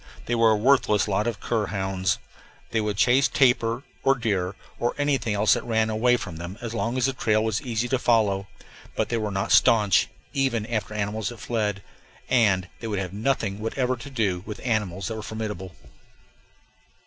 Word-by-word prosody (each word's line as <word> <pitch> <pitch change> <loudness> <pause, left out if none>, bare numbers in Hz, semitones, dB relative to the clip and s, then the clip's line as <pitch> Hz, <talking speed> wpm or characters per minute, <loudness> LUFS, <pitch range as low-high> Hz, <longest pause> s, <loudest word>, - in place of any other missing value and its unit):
They 120 - -2
were 115 -1 +4
a 110 - +4
worthless 110 -2 +3
lot 105 +2 0
of 115 -4 -2
cur 110 -3 -1
hounds. 95 -2 -1 0.5
They 110 - +1
would 105 -2 -2
chase 125 +6 +4
tapir 120 -1 +2 0.2
or 135 0 +4
deer 100 -6 -1 0.2
or 120 - 0
anything 135 -7 0
else 105 +1 +4
that - - -1
ran 110 -1 +1
away 120 +3 +3
from 90 -8 -7
them 85 +4 -7
as 115 -2 -5
long 120 +2 -1
as 130 - +2
the 135 - +1
trail 110 -4 +1
was 110 -1 -1
easy 120 -1 -2
to 130 - +1
follow; 105 -6 +2 0.5
but - - -1
they 115 - 0
were 110 -2 -2
not 95 -1 -2
stanch, 105 -5 +5 0.3
even 130 -6 0
after 110 -3 -3
animals 105 +1 -2
that 120 - -9
fled, 105 -3 -2 0.5
and 100 -7 +3
they 115 - -5
would 105 -2 -2
have 95 -1 -3
nothing 105 -2 -1
whatever 125 +3 -1
to 125 +3 -10
do 105 -9 -1
with 105 0 -7
animals 100 -6 -1
that 110 - -4
were - - -5
formidable. 105 -5 -5
110 Hz, 190 wpm, -25 LUFS, 100-120 Hz, 0.5 s, stanch